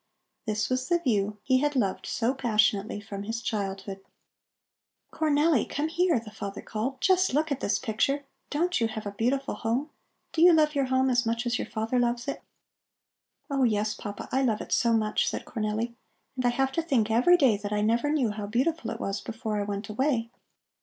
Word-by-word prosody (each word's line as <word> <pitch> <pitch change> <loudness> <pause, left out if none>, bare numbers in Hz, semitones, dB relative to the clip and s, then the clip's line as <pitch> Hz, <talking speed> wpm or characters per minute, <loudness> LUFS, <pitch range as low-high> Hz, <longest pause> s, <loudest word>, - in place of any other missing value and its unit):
This 215 0 0
was 255 +2 -1
the 345 - +4
view 210 -9 0
he 260 +1 +3
had 290 +1 0
loved 200 -7 0
so 240 +2 0
passionately 215 -4 +1
from 200 -1 -7
his 225 +3 -3
childhood. 195 -3 -3 1.1
"Cornelli, 305 -3 +2
come 300 +2 -1
here!" 340 -3 +2
the 220 -1 -11
father 200 -2 -6
called. 245 +5 -3
"Just 370 -6 +3
look 310 +1 +1
at 275 - 0
this - - +1
picture! 275 +5 0 0.2
Don't 345 +1 0
you 230 - +3
have 220 -1 -6
a 205 - -3
beautiful 255 +7 -1
home? 245 +7 -2 0.4
Do 320 - 0
you 350 0 +8
love 305 -1 +4
your 280 -2 +1
home 260 0 +2
as 245 -1 +3
much 230 +1 -1
as 240 0 0
your - - -3
father 225 +3 -1
loves 240 +1 0
it?" 280 - -3 1.1
"Oh 275 -2 -1
yes, 215 -2 +1
Papa, 205 0 -7
I 265 - +2
love 230 -5 +1
it - - -8
so 235 -2 +3
much!" 215 -2 +1
said - - -3
Cornelli. 220 +2 -2 0.4
"And 255 -1 -2
I - - +5
have 265 +2 0
to 330 - 0
think 255 -10 +1
every 255 +11 +5
day 265 -9 +4
that 205 0 -6
I 210 0 +1
never 230 +6 +2
knew 265 -8 +1
how 210 -1 -5
beautiful 285 +10 0
it - - -5
was 195 +1 -3
before 220 -2 -3
I - - -2
went 200 0 -4
away. 230 0 0
235 Hz, 200 wpm, -27 LUFS, 215-275 Hz, 1.1 s, you